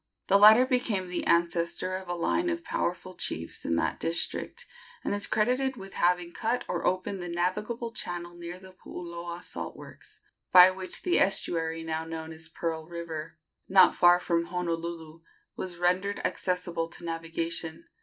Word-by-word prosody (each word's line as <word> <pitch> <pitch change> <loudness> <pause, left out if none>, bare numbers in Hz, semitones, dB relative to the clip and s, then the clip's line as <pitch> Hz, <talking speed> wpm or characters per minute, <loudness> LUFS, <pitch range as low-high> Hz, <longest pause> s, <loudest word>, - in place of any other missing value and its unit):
The 200 +1 +6
latter 220 +4 +9
became 230 -8 0
the 180 - -3
ancestor 170 +2 +1
of 190 0 -6
a 175 - -1
line 335 - +1
of 335 0 -3
powerful 185 - -2
chiefs 85 - -4
in 85 - +1
that 85 - 0
district, 165 +1 -3 0.4
and - - -1
is 205 0 0
credited 255 +4 +1
with 195 -2 -9
having 175 0 +1
cut 230 +6 -1
or - - -1
opened 185 +1 -1
the 175 - -5
navigable 210 +7 -2
channel 175 -4 -5
near 175 +1 -7
the 185 0 -13
Puuloa 170 -1 -7
salt - - -6
works, - - -12 0.3
by 180 0 +9
which 185 0 -3
the 360 - +3
estuary 165 -4 +2
now 160 0 -2
known 160 0 -6
as 160 +1 -7
Pearl 160 -1 -4
River, 170 -2 -6 0.3
not 190 -1 +7
far 175 0 +6
from 170 -1 0
Honolulu, 170 -2 -4 0.3
was 180 -2 -5
rendered 180 +3 +1
accessible 175 -2 -1
to 170 +1 -9
navigation. 165 - -3
175 Hz, 160 wpm, -28 LUFS, 170-190 Hz, 0.4 s, latter